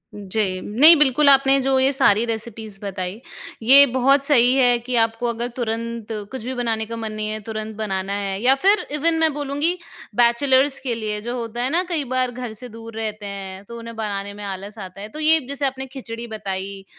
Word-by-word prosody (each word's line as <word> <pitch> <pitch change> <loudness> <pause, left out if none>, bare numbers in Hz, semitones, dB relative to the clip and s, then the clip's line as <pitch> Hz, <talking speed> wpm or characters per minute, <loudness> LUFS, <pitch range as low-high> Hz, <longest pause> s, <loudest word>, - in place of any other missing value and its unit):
जी। 195 -2 -2
नहीं 295 +11 +6
बिल्कुल, 285 0 +4
आपने 275 0 +6
जो 265 0 +1
ये 265 +1 +3
सारी 235 -5 +4
रेसिपीज़ 220 -3 -5
बताई, 190 +2 -5 0.4
ये 275 +4 +8
बहुत 275 +2 +3
सही 250 -3 +5
है 245 -2 +4
कि 245 +1 -4
आपको 225 +1 -1
अगर 235 +1 -3
तुरंत 230 -1 -4 0.2
कुछ 260 -4 -6
भी 260 - -3
बनाने 225 -3 -1
का 230 +1 -7
मन 220 -1 -4
नहीं 215 0 -3
है, 215 0 -3
तुरंत 215 0 -5
बनाना 195 -2 -3
है 200 -1 -3
या 260 +2 +4
फिर 405 +2 +4
इवन 325 +3 +1
मैं 320 -1 +3
बोलूँगी 290 +4 -1 0.4
बैचलर्स 260 +3 +3
के 245 -4 -3
लिए 210 -2 -3
जो 240 +3 -5
होता 235 0 -4
है 260 - +1
ना 345 +4 +2
कई 315 -4 0
बार 255 -1 +1
घर 245 -2 -7
से 250 - -9
दूर 225 0 -11
रहते 215 -1 -5
हैं, 195 -1 -7
तो 235 +2 -10
उन्हें 230 0 -9
बनाने 200 -2 -4
में 205 0 -9
आलस 200 +2 -6
आता 190 0 -9
है। 210 - -7
तो 305 - -8
ये 315 +1 +4
जैसे 280 0 -2
आपने 265 0 -3
खिचड़ी 240 -3 -8
बताई 195 -2 -5
230 Hz, 210 wpm, -21 LUFS, 210-265 Hz, 0.4 s, ये